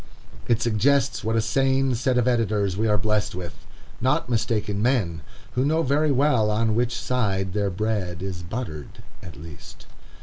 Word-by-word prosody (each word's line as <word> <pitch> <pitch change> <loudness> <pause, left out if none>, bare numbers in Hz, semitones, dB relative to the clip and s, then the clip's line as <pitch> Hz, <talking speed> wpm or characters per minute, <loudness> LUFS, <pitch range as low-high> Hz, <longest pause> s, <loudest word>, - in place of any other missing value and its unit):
It 120 -1 +2
suggests 130 +4 +2
what 110 +1 0
a 115 - +3
sane 135 +3 +1
set 125 +1 0
of 125 0 +2
editors 105 -6 +1
we 110 +3 0
are 105 -1 +3
blessed 105 0 0
with, 90 -3 -6 0.5
not 125 0 +1
"mistaken 105 -3 0
men"; 105 - +1 0.3
who 125 - 0
know 160 +3 +2
very 145 +2 +2
well 130 -5 +3
on 110 +1 +1
which 120 +2 0
side 95 -7 -1
their 100 -1 0
bread 95 -3 -2
is 95 -3 -4
buttered, 85 - -7 0.2
at 80 - -10
least. 80 -1 -12
110 Hz, 165 wpm, -24 LUFS, 100-125 Hz, 0.5 s, a